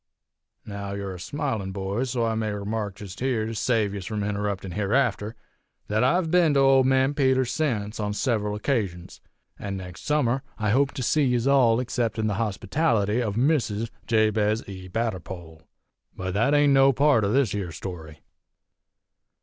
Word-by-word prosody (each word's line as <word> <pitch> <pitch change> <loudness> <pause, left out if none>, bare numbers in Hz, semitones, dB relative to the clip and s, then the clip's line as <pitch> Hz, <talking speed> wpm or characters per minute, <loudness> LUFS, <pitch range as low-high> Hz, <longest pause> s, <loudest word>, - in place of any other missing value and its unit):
Now 100 -1 -6
yer 100 -1 -4
a 90 - -9
smilin', 115 - -3
boys, 100 +6 -2
so 120 -2 0
I 115 - 0
may 110 -1 -1
remark 105 0 -3
jest 100 -2 -9
here, 125 -4 0
to 115 - -4
save 110 -2 0
yez 100 -3 -6
from 110 -2 -3
interruptin' 100 -2 -3
hereafter, 105 +1 0 0.5
thet 110 +3 +1
I've 165 +5 +2
ben 170 -5 +4
to - - +4
Old 135 -1 +5
Man 135 +1 +3
Peters's 130 -3 +2
sence, 115 -9 -2
on 105 -1 -1
several 105 -3 -1
occasions; 100 -7 -3 0.4
an' 100 -1 -4
nex' 90 -2 -9
summer 135 -4 +1 0.2
I 105 -2 0
hope 140 +4 +3
to 130 - -4
see 150 +4 +2
yez 125 -2 +1
all 130 -5 +4
acceptin' 115 -3 -1
the 105 +1 -1
hospitality 110 +1 0
of 105 -4 -2
Mrs. 115 -5 +1 0.2
Jabez 110 -1 +1
E. 95 -2 -8
Batterpole! 90 -6 -4 0.5
But 95 0 -4
thet 115 +9 +2
ain't 145 -1 +4
no 135 0 +6
part 140 -4 +3
o' 100 - +1
this 130 -4 +2
here 100 -5 -3
story! 80 -3 -8
110 Hz, 165 wpm, -25 LUFS, 100-130 Hz, 0.5 s, no